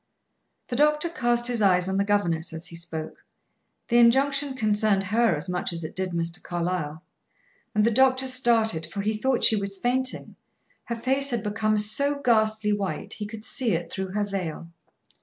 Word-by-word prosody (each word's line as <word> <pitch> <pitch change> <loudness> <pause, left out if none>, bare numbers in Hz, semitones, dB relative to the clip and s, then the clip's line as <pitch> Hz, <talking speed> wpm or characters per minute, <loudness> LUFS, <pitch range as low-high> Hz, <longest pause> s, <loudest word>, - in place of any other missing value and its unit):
The 245 - -3
doctor 300 +4 +2
cast 240 -6 0
his 240 -2 0
eyes 180 -2 +3
on 190 0 -1
the 200 - +2
governess 175 -6 0
as 160 +1 -6
he 170 - -9
spoke; 165 -2 -6 0.6
the 240 0 +3
injunction 275 +3 +3
concerned 210 -4 +2
her 220 0 +2
as 150 +4 -3
much 180 0 -2
as 170 -1 -3
it 155 - -7
did 185 0 -2
Mr. 170 0 -2
Carlyle. 170 -3 -3 0.7
And 210 0 +3
the 230 - +3
doctor 260 +2 +3
started, 230 -9 +2
for 200 - -5
he 215 +2 -1
thought 255 +3 0
she 220 - +7
was 200 -1 -3
fainting; 255 +5 -1 0.5
her 235 - -3
face 265 +4 +1
had 240 -4 -1
become 215 0 0
so 280 +8 +1
ghastly 220 -4 +2
white; 205 0 -3
he 210 - -5
could 215 0 -9
see 240 -1 0
it 165 0 -3
through 190 -1 -5
her 210 0 0
veil. 175 -4 -5
210 Hz, 180 wpm, -25 LUFS, 185-240 Hz, 0.7 s, she